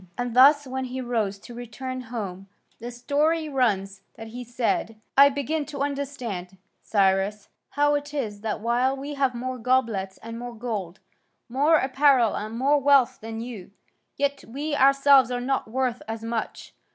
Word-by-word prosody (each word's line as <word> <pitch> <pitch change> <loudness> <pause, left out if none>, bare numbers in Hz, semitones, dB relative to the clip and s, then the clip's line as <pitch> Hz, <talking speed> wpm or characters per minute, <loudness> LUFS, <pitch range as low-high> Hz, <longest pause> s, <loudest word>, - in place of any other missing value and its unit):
And 245 -1 -3
thus 285 +3 +7
when 260 0 -4
he 255 +1 -5
rose 225 -6 -1
to 240 - -12
return 255 +2 -6
home, 195 -5 -5 0.3
the 235 - -6
story 300 +6 0
runs 200 -8 0
that 225 0 -9
he 245 +2 -7
said: 230 -2 -2 0.2
"I 280 +1 +8
begin 285 +3 -2
to 280 -2 -3
understand, 250 -10 -4 0.2
Cyrus, 195 0 +1 0.2
how 290 +1 +2
it 290 0 -2
is 220 -9 -4
that 215 -1 -3
while 245 +4 +1
we 280 +2 -6
have 270 -3 0
more 255 +1 -4
goblets 225 -6 0
and 230 +1 -7
more 245 0 -7
gold, 210 -6 -5 0.5
more 285 +6 +3
apparel 265 -4 +3
and 215 +2 -5
more 280 +4 +3
wealth 280 -2 +4
than 225 0 -6
you, 230 -6 -8 0.5
yet 280 0 -1
we 290 +6 -4
ourselves 275 -2 +5
are 245 -1 -2
not 265 0 -1
worth 250 0 -1
as 225 0 -5
much. 230 -1 -4
245 Hz, 165 wpm, -25 LUFS, 225-275 Hz, 0.5 s, I